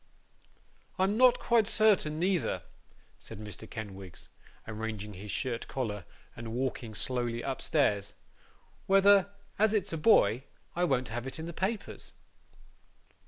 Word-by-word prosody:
'I'm 190 +2 +2
not 250 +1 +6
quite 230 -3 +3
certain 210 -9 +3
neither,' 180 -1 0 0.6
said - - -9
Mr. 105 -2 -9
Kenwigs, 95 -4 -8 0.4
arranging 110 -1 -5
his 100 +3 -9
shirt 120 +1 -2
collar, 105 -8 -3 0.3
and 115 -1 -7
walking 120 -3 -3
slowly 120 +1 -2
upstairs, 105 -7 0 0.7
'whether, 195 0 +6 0.3
as 220 +1 +4
it's 200 -5 -1
a - - -1
boy, 135 - +4 0.3
I 175 +1 +2
won't 130 -6 0
have 120 +3 -4
it 135 - -4
in 160 - -5
the 170 - -6
papers. 200 +5 -4
130 Hz, 125 wpm, -30 LUFS, -, 0.7 s, not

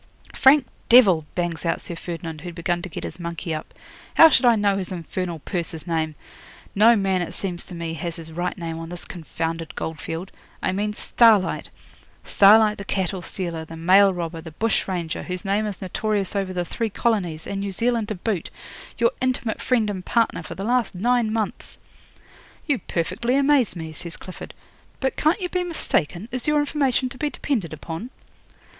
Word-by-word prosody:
'"Frank 270 0 +6 0.2
Devil!" 190 -11 +7
bangs 170 -4 -2
out 165 - 0
Sir 170 - -7
Ferdinand, 165 -2 -6
who'd 175 0 -7
begun 175 0 -1
to 185 - -6
get - - -6
his - - -6
monkey 170 0 -4
up. 155 - -6 0.4
"How 325 - +10
should 275 - +4
I 240 -1 +6
know 205 -2 +2
his 190 -1 -4
infernal 175 0 -4
purser's 165 0 -4
name? 160 -3 -1 0.6
No 225 +4 +6
man, 195 -3 +1
it 175 - -4
seems 180 -3 -2
to 180 - -8
me, 165 -1 -4
has 165 +1 -4
his 165 -1 -7
right 175 +4 -3
name 165 -2 -4
on 165 0 -7
this 175 0 -6
confounded 165 -1 -4
goldfield. 165 +3 -5 0.3
I - - +2
mean 205 +2 -1
Starlight 215 -3 +3 0.5
Starlight 210 +1 +6
the - - -4
cattle 190 -1 -2
stealer, 170 -2 -4
the 165 +1 -10
mail 190 +4 +6
robber, 170 -2 -4
the 160 - -9
bush 225 +5 0
ranger, 175 -4 -3
whose 180 +2 -5
name 205 +2 +1
is 200 -2 -6
notorious 205 +1 -1
over 195 -2 -1
the 180 -1 -2
three 230 +5 -2
colonies, 190 -8 -1
and 195 - -3
New 200 0 -3
Zealand 230 +2 0
to 215 - -3
boot 190 -2 -2 0.5
your 235 -1 +3
intimate 255 -3 -1
friend 235 -4 +2
and 190 -3 -4
partner 230 +3 +1
for - - -8
the 195 - -4
last 245 -3 +1
nine 235 +3 +2
months!" 220 -2 -3 0.9
'"You 285 -6 +1
perfectly 185 +9 -1
amaze 280 -6 +3
me," 160 -2 -6
says 170 +1 -6
Clifford. 185 - -10 0.4
"But 265 -1 -1
can't 310 +6 +2
you 360 - -2
be 360 0 0
mistaken? 215 - 0
Is 255 +2 -3
your 300 0 +3
information 280 -3 +1
to 250 - -11
be 300 - 0
depended 225 - -2
upon?" 165 +8 -6
190 Hz, 185 wpm, -23 LUFS, 170-225 Hz, 0.9 s, How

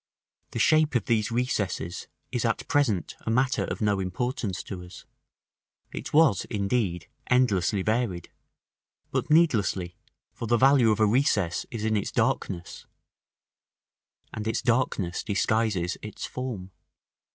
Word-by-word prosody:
The - - -6
shape 155 +5 +3
of 120 - +1
these 110 -2 +1
recesses 110 -7 -2 0.2
is - - -1
at - - -1
present 115 - +1
a - - +1
matter 130 +3 +2
of - - -5
no 105 -2 +2
importance 95 +1 -3
to 90 -3 -7
us: 90 - -12 0.9
it - - -6
was, 150 - +4
indeed, 100 -5 -1 0.2
endlessly 105 -6 +2
varied; 110 -6 -1 0.8
but - - -1
needlessly, 110 - +2 0.4
for 115 - -6
the 120 +1 +3
value 135 -1 +5
of 110 0 +2
a 110 - +5
recess 105 -6 +1
is 115 -4 -4
in 110 0 +1
its 100 - -1
darkness, 85 -1 -2 1.5
and 110 0 -4
its 110 - -1
darkness 115 -7 0
disguises 100 -3 0
its 105 - -6
form. 115 -8 -5
110 Hz, 130 wpm, -27 LUFS, 95-125 Hz, 1.5 s, value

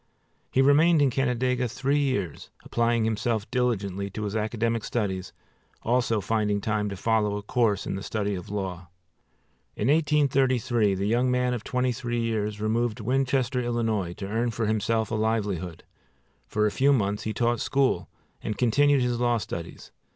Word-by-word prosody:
He 135 - +3
remained 155 +4 +5
in 140 -2 +3
Canandaigua 125 -1 0
three 135 +4 0
years, 100 - -2
applying 115 -1 +1
himself 110 0 -1
diligently 100 -6 -1
to 105 +2 -5
his 105 0 -3
academic 115 +1 -1
studies, 95 -5 -2 0.5
also 120 -2 +1
finding 105 -1 0
time 105 0 -1
to 100 - -5
follow 105 0 +1
a 105 - -6
course 105 -3 +1
in - - -3
the 95 - -4
study 105 0 -2
of 90 -2 -6
law. 95 -3 -4 0.9
In 105 - 0
1833 130 -8 +2
the 95 +1 -2
young 120 +4 +2
man 125 0 +1
of 120 - -4
twenty 125 -1 0
three 120 0 -3
years 105 -2 -1
removed 110 +2 0
to 110 - -8
Winchester, 130 +1 +1
Ill., 120 -1 -2
to 100 -4 -2
earn 115 +4 0
for 115 0 -2
himself 110 +1 0
a - - -2
livelihood. 105 -6 -1 0.6
For 105 0 +1
a 105 - +2
few 140 +6 +3
months 105 -4 0
he 110 - -1
taught 120 +1 0
school 130 -10 +1 0.3
and 105 - -4
continued 140 +3 +3
his 120 -1 -1
law 120 -1 +2
studies. 90 -5 -7
115 Hz, 165 wpm, -26 LUFS, 105-125 Hz, 0.9 s, remained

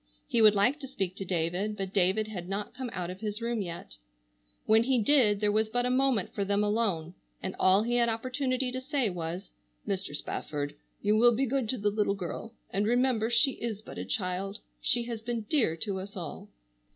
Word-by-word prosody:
He 235 - +2
would 215 -1 +7
like 245 +9 +3
to 275 - -7
speak 195 -9 -3
to 195 - -4
David, 180 +4 -1
but 195 -1 -4
David 200 +3 +3
had 185 -4 -6
not 200 +1 -3
come 255 -1 -5
out 180 -3 -3
of 185 - -9
his 210 0 -3
room 235 -1 -1
yet. 170 - -7 0.7
When 220 +1 +5
he 255 +2 +2
did 220 -4 +4
there 210 -1 +3
was 215 +1 +1
but 245 +2 0
a 250 - +1
moment 255 -6 +1
for 200 - -1
them 200 +1 +1
alone 205 -6 0 0.3
and 185 - -3
all 190 +3 +5
he 240 +1 +1
had 235 -1 +3
opportunity 255 +2 -1
to 255 +1 -4
say 265 -5 0
was: 175 +1 -5 0.4
"Mr. 190 -6 -2
Spafford, 145 -1 -3 0.3
you 210 +1 +3
will 240 +1 +6
be 270 +4 +2
good 260 -3 -1
to 255 - 0
the 205 -1 +1
little 205 -1 +1
girl, 200 +5 -6 0.2
and 205 +2 +1
remember 240 -2 +2
she 240 +4 +5
is 220 -3 -3
but - - -8
a - - -2
child. 195 -1 -2 0.2
She 240 0 +2
has 235 -2 -5
been 235 0 -2
dear 215 - +2
to 200 0 -2
us 195 +1 -8
all." 160 - -7
215 Hz, 210 wpm, -29 LUFS, 190-240 Hz, 0.7 s, would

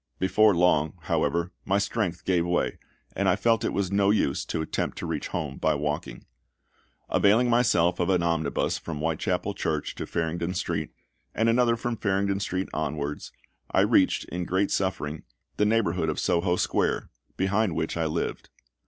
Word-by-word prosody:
Before 95 +2 +4
long, 80 -3 +3
however, 85 +2 0
my 100 +1 +1
strength 100 -4 -2
gave 90 -3 +2
way, 85 0 -1 0.4
and - - +2
I - - +4
felt 115 -2 +2
it - - 0
was 100 -2 -1
no 100 0 +3
use 100 -9 +1
to 80 - -2
attempt 80 - -3
to - - -4
reach - - -3
home 70 -3 -4
by 80 -1 +1
walking. 75 0 -3 0.8
Availing 115 +5 +3
myself 90 -8 +3
of 90 - +1
an 90 -2 +2
omnibus 80 -4 0
from 80 -3 -6
Whitechapel 80 +1 -1
Church - - -2
to - - -6
Farringdon 85 +2 -2
Street, - - -2 0.5
and 115 - +2
another 120 0 +3
from 115 0 -3
Farringdon 100 -1 0
Street 95 -1 -2
onwards, 75 -1 -3 0.4
I - - +3
reached, - - +3
in 90 0 -3
great 95 +3 0
suffering, 80 -5 -1 0.4
the 105 - +3
neighbourhood 95 -7 +1
of 75 - -2
Soho 90 +1 +1
Square, - - 0 0.3
behind 95 0 +1
which 80 - -2
I 85 -1 0
lived. 80 +2 -3
90 Hz, 165 wpm, -26 LUFS, 80-100 Hz, 0.8 s, Before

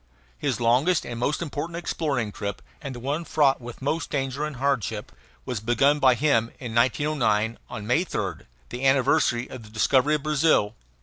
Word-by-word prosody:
His - - -1
longest 125 +10 +2
and 120 -1 -5
most 150 +7 0
important 165 +2 -4
exploring 140 -10 -2
trip, 100 0 -5 0.2
and 140 -4 -6
the - - -7
one 145 +7 -2
fraught 145 -5 +2
with 120 +2 -9
most 155 +4 -1
danger 135 0 -2
and 150 -1 -5
hardship, 120 -7 -1 0.3
was 125 -5 -3
begun 120 +7 +2
by 130 -3 +5
him 120 -4 +2
in 120 -4 -6
1909, 115 -3 +1
on 110 -3 -6
May 125 +10 +2
3rd, - - -4 0.2
the 125 - -6
anniversary 130 -2 +3
of 130 - -9
the 105 - -13
discovery 130 +6 +3
of 150 - -4
Brazil. 150 -8 +2
130 Hz, 175 wpm, -25 LUFS, 115-150 Hz, 0.3 s, by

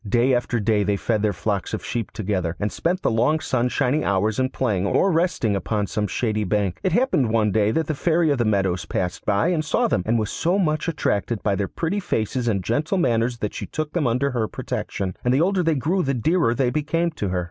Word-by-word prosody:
Day 120 +4 +3
after 120 -1 0
day 105 0 +2
they 100 0 0
fed 110 +1 0
their 105 -1 +2
flocks 100 +1 -2
of - - -7
sheep 115 -4 -3
together, 95 -5 -2
and 105 0 -1
spent 180 +2 -1
the - - +2
long 125 +8 +2
sunshiny 130 +1 0
hours 100 +4 +1
in 130 0 +1
playing, 105 -8 -1
or 195 - +2
resting 165 - +1
upon 100 +3 -1
some 105 +1 -2
shady 110 +1 -1
bank. 100 -2 -1
It 190 - 0
happened 235 - +2
one 110 -2 +2
day 105 +1 +2
that 160 +8 0
the 155 - -2
Fairy 165 +1 +2
of 140 - 0
the - - +3
Meadows 95 -4 0
passed 90 0 -3
by 105 +10 +2
and 165 -4 0
saw 155 - +1
them, - - +1
and 115 +1 +2
was 110 -2 -1
so 175 +4 0
much 155 -4 0
attracted 120 -8 -1
by 100 - +1
their 100 0 -1
pretty 175 +5 -2
faces 120 - -2
and 100 -5 0
gentle 155 - 0
manners 120 -7 +1
that 105 - -2
she - - -5
took 155 -1 -4
them 160 -7 +1
under 125 +4 +1
her 115 -3 -1
protection, 95 -2 -4
and 125 - +2
the 140 - +3
older 190 +2 +2
they 165 -2 +1
grew 165 +8 0
the 135 -4 0
dearer 125 -1 +2
they 130 -2 +1
became 165 +4 0
to 105 -11 -3
her. 90 0 0
120 Hz, 235 wpm, -23 LUFS, 105-155 Hz, -, Day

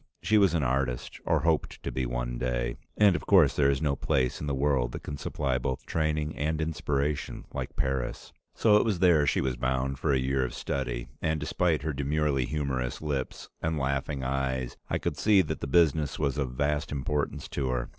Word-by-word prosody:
She 110 0 +4
was 95 -4 +4
an 80 - +1
artist, 65 -1 -1
or - - +3
hoped 80 -2 0
to - - -3
be 65 -1 -1
one - - -3
day, - - -1 0.2
and 100 -3 +6
of 75 - -4
course 90 -8 +6
there 70 -2 +4
is 70 +2 0
no 70 -2 +2
place 65 -2 0
in 75 - -3
the 70 - 0
world 65 -3 +1
that - - -6
can 70 - -5
supply 70 -2 -1
both 65 +1 -3
training 75 -1 -1
and 80 +2 -1
inspiration 75 -2 -2
like 65 -1 -4
Paris. 65 -2 -2 0.2
So 105 -2 +5
it - - +4
was 110 -5 0
there 85 -5 +4
she - - +2
was 65 -2 -1
bound 65 +2 -1
for 75 - +1
a 70 - +3
year 65 +1 +1
of 65 - -4
study, 60 -2 -3
and 80 -1 0
despite 80 0 0
her 80 -1 -1
demurely 70 -1 0
humorous 65 -4 -2
lips 70 -4 -3
and 80 0 -1
laughing 70 0 -1
eyes, 65 -1 -1
I - - +1
could - - -3
see 105 -3 +5
that - - -4
the - - -4
business 75 -1 +3
was 70 -4 0
of 65 -3 -2
vast 75 +4 -1
importance 75 +1 -2
to 70 -2 -2
her. 60 -1 -2
70 Hz, 205 wpm, -28 LUFS, 65-75 Hz, 0.2 s, and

